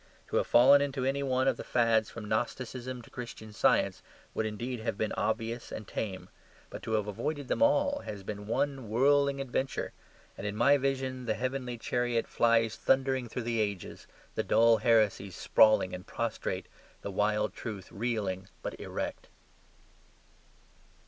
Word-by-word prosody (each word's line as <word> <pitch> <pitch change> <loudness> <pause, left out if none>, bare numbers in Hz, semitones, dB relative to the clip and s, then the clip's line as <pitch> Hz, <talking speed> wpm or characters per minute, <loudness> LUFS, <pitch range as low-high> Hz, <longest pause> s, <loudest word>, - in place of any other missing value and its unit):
To - - 0
have - - +1
fallen 135 +4 +7
into 135 -2 -1
any 135 +1 0
one 130 -1 +1
of - - +2
the - - -6
fads 115 -3 +2
from 115 -2 -8
Gnosticism 125 +3 -3
to - - -17
Christian 115 -3 -8
Science - - +2 0.3
would 110 - -1
indeed 120 +4 -4
have 110 -2 -3
been 110 - -1
obvious 115 +2 -2
and 105 - -6
tame. 95 -4 -4 0.4
But - - -7
to 110 - -4
have 105 -2 +1
avoided 145 +6 -3
them - - 0
all 285 0 +3
has 100 - -7
been 105 +1 -6
one 130 0 -1
whirling 140 +4 +3
adventure; 135 0 -2 0.5
and 100 - -3
in 105 - -3
my 120 +6 +5
vision 130 -1 -2
the 110 - +1
heavenly 125 -1 -3
chariot 120 0 0
flies 115 -1 +2
thundering 130 -2 +1
through 125 - -4
the 115 0 -1
ages, 100 -4 -3 0.3
the - - 0
dull 115 0 +5
heresies 110 -4 +2
sprawling 110 -4 +4
and 90 +2 -7
prostrate, 115 -1 -3 0.4
the 100 - -4
wild 105 +2 +1
truth 105 -5 -7
reeling 100 -3 -2 0.2
but - - -3
erect. - - -5
115 Hz, 160 wpm, -30 LUFS, 110-130 Hz, 0.5 s, fallen